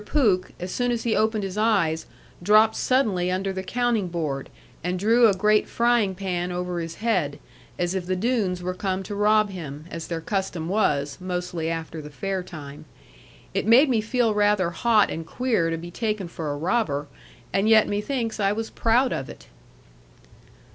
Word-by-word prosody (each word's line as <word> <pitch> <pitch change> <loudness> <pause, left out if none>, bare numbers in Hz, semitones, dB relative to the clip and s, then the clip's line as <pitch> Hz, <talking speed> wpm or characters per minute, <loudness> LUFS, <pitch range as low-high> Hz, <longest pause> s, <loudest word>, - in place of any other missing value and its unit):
Pooke, 210 -9 +1
as 180 +1 -5
soon 245 0 0
as 235 -1 -2
he 230 -2 +1
opened 215 -1 +1
his 195 +1 -4
eyes, 190 -8 +1 0.3
dropped 215 +4 +5
suddenly 210 -9 +1
under 190 +1 -1
the 190 - -3
counting 235 -1 0
board, 155 -6 -3 0.3
and 180 +1 -1
drew 230 +5 +5
a 200 - +3
great 210 +2 +2
frying 235 -5 +2
pan 180 -2 -2
over 180 0 -3
his 165 0 -5
head, 180 -11 0 0.4
as 175 0 -1
if 185 -2 -3
the 185 - 0
Doones 195 -4 0
were 185 +1 -2
come 190 0 -2
to 205 - -6
rob 210 0 +3
him, 155 -5 -7
as 165 -1 -6
their 165 -1 -3
custom 180 -2 -3
was, 150 -8 0
mostly 180 -2 -3
after 165 -1 -4
the 150 - -9
fair 190 +5 -3
time. 150 -3 -10 0.7
It - - -1
made 255 +6 +6
me 230 -4 +2
feel 225 0 +1
rather 205 -4 +2
hot 215 +4 +3
and 165 - -4
queer 220 -3 0
to 165 - -2
be 175 +1 -8
taken 210 -2 -2
for 160 -3 -5
a 145 - -3
robber; 160 -4 0 0.5
and 200 +3 +2
yet 220 -1 +6
methinks 225 +2 -2
I 200 0 +2
was 225 +1 -4
proud 245 +3 +2
of 135 - -4
it. - - -12
190 Hz, 180 wpm, -24 LUFS, 170-220 Hz, 0.7 s, made